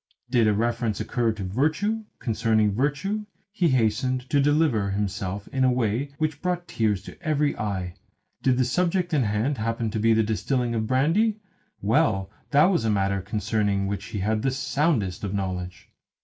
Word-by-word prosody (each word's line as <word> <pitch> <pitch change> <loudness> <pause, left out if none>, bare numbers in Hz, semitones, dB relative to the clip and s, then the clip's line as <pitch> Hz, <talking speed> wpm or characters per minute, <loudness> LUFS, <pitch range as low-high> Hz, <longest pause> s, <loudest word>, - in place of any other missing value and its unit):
Did 120 -4 +4
a 105 - +4
reference 115 -1 0
occur 120 -2 0
to 105 -2 -6
virtue, 155 - 0
concerning 110 -3 +1
virtue 150 - -1 0.2
he 185 -4 +1
hastened 125 +1 +1
to 145 - +4
deliver 145 -8 +2
himself 100 0 -3
in 130 -1 0
a 130 - +4
way 125 +2 0
which 155 -1 -2
brought 180 -1 -2
tears 105 -4 0
to - - -12
every 150 -3 +1
eye. 95 -4 -3 0.5
Did 130 -2 +2
the 130 - +3
subject 175 +5 0
in 145 - +3
hand 110 +5 0
happen 115 0 -1
to 110 - -2
be 115 +1 +4
the 110 0 +3
distilling 120 +3 -1
of 110 -1 -1
brandy 165 - +2 0.5
well, 100 -2 +2 0.2
that 145 0 +5
was 175 - +1
a 110 - +1
matter 100 -1 +1
concerning 105 -1 0
which 100 0 -3
he - - -6
had 110 +2 0
the 135 - +1
soundest 130 - 0
of 100 0 -2
knowledge. 90 -2 -4
115 Hz, 175 wpm, -25 LUFS, 105-145 Hz, 0.5 s, that